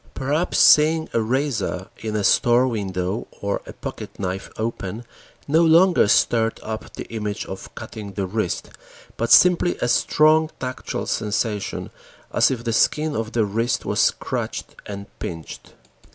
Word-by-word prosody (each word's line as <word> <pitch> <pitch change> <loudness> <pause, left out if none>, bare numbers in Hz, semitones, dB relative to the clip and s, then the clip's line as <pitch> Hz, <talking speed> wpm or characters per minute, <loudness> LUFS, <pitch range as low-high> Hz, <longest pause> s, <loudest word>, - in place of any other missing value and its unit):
Perhaps 145 +6 -1
seeing 160 +1 +5
a 115 - +2
razor 110 -6 -1
in 110 -1 -4
a 105 - 0
store 120 +5 +4
window 100 -2 -3
or 100 0 -2
a - - -8
pocket - - -8
knife 95 0 -4
open 110 0 -4 0.4
no 155 +3 +4
longer 170 - +5
stirred 115 +2 +2
up 110 0 -6
the - - -7
image 105 -1 -3
of 95 - -9
cutting 100 -2 -8
the 100 0 -2
wrist, 95 -1 -3 0.4
but 115 +1 -2
simply 180 -1 +5
a - - -1
strong 155 +5 +3
tactual 130 -1 -4
sensation, 105 -1 -2 0.4
as - - +4
if 125 -3 -3
the 115 -1 -1
skin 150 +6 +2
of 110 0 -3
the 115 -2 +2
wrist 115 +4 -1
was - - -1
scratched - - -1
and 100 -1 -6
pinched. 80 -2 -7
115 Hz, 150 wpm, -22 LUFS, 100-140 Hz, 0.4 s, seeing